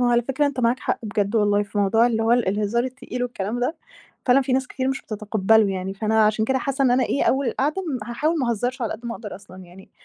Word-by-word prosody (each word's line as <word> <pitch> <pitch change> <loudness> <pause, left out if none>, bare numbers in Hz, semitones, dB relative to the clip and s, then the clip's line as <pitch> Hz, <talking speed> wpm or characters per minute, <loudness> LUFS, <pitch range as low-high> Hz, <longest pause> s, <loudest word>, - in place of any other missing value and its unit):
هو - - +3
على 240 0 +3
فكرة 270 +4 0
أنت 275 -3 -2
معاك 240 +1 +2
حق - - -1
بجد 210 0 -1
والله 205 -1 +3
في 205 0 -5
موضوع 225 +4 +4
اللي 225 -2 0
هو 225 +1 +3
الهزار 215 0 +1
التقيل 255 -1 -5
والكلام 240 -1 -3
ده 305 +7 -1 0.5
فعلًا 255 +1 +5
في 260 - -2
ناس 260 0 +1
كتير 260 0 -3
مش 270 - -2
بتتقبّله 215 0 +2
يعني، 190 0 -4
فأنا 220 +1 +2
عشان 215 +1 +2
كده 265 +3 +1
حاسَّة 275 +2 -1
إن 255 - +4
أنا 250 +1 +3
إيه 280 - 0
أوِّل 270 0 +2
القعدة 295 +10 -1
ام 255 - -4
هاحاول 305 +8 0
ما 255 -4 0
اهزرش 245 +3 -2
على 230 - -1
قد 235 +2 -8
ما 235 - -3
أقدر 210 -3 -8
أصلًا 195 -1 -13
يعني 185 +1 -14
235 Hz, 250 wpm, -23 LUFS, 210-255 Hz, 0.5 s, فعلًا